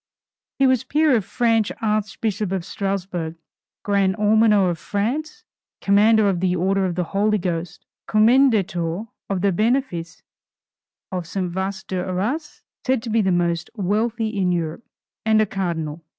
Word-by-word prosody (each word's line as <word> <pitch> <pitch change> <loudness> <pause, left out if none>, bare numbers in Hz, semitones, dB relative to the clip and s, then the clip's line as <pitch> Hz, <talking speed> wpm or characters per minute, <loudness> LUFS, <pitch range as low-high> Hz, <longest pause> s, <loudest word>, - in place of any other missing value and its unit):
He 275 - +3
was 260 -1 +3
Peer 295 +1 +3
of 220 - +1
France, 225 -2 +1
Archbishop 215 -1 -1
of 190 -3 -2
Strasburg, 190 -5 -3 0.5
Grand 200 -2 +2
Almoner 210 -3 +4
of 165 - -5
France, 280 - -3 0.4
Commander 210 +2 +4
of 190 -3 +1
the 180 0 +1
Order 190 +2 +1
of 180 -2 -2
the 180 - 0
Holy 205 +5 +1
Ghost, 175 -3 -4 0.2
Commendator 215 -6 +3 0.3
of 195 -2 -1
the 200 0 +3
benefice 190 -6 -1 0.9
of 180 -3 -4
St. 180 0 -3
Wast 190 +1 -4
d'Arras, 190 - -3 0.2
said 260 -3 0
to 230 - -4
be 225 0 +3
the 190 -2 +1
most 170 -1 0
wealthy 220 +3 0
in 185 -2 +1
Europe, 170 +3 -2 0.4
and 220 0 +3
a 215 - +4
Cardinal. 170 -5 -3
200 Hz, 145 wpm, -22 LUFS, 180-220 Hz, 0.9 s, Almoner